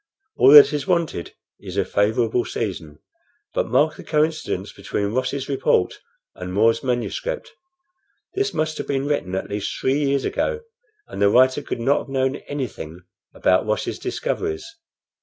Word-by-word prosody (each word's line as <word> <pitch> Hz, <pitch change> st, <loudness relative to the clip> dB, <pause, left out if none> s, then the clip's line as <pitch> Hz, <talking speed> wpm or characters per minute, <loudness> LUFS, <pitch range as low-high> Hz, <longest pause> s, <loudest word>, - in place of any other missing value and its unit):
All 130 Hz, -, +6 dB
that 150 Hz, 0 st, +10 dB
is 150 Hz, +3 st, -2 dB
wanted 170 Hz, -, -1 dB, 0.2 s
is -, -, -8 dB
a -, -, +2 dB
favorable 110 Hz, +3 st, +1 dB
season. 90 Hz, -9 st, -5 dB, 0.6 s
But -, -, 0 dB
mark 145 Hz, +7 st, +2 dB
the -, -, -10 dB
coincidence 155 Hz, 0 st, -1 dB
between 100 Hz, +1 st, -3 dB
Ross's 130 Hz, +2 st, -2 dB
report 135 Hz, -9 st, +1 dB, 0.3 s
and 90 Hz, 0 st, -7 dB
More's 115 Hz, +4 st, +3 dB
manuscript. 130 Hz, -, -3 dB, 0.8 s
This 405 Hz, +1 st, 0 dB
must 155 Hz, 0 st, -2 dB
have -, -, -4 dB
been 135 Hz, -1 st, -1 dB
written 145 Hz, -11 st, -1 dB
at 95 Hz, -, -3 dB
least 100 Hz, 0 st, -3 dB
three 135 Hz, +2 st, +1 dB
years 140 Hz, -1 st, +1 dB
ago, 465 Hz, -2 st, -1 dB, 0.5 s
and -, -, -7 dB
the 100 Hz, -, +5 dB
writer 130 Hz, +5 st, +4 dB
could 140 Hz, -, -5 dB
not 135 Hz, +5 st, +2 dB
have -, -, -9 dB
known 135 Hz, 0 st, 0 dB
anything 105 Hz, -, -6 dB, 0.3 s
about 95 Hz, +3 st, +2 dB
Ross's 110 Hz, -, -2 dB
discoveries. 400 Hz, 0 st, -3 dB
130 Hz, 155 wpm, -22 LUFS, 105-150 Hz, 0.8 s, that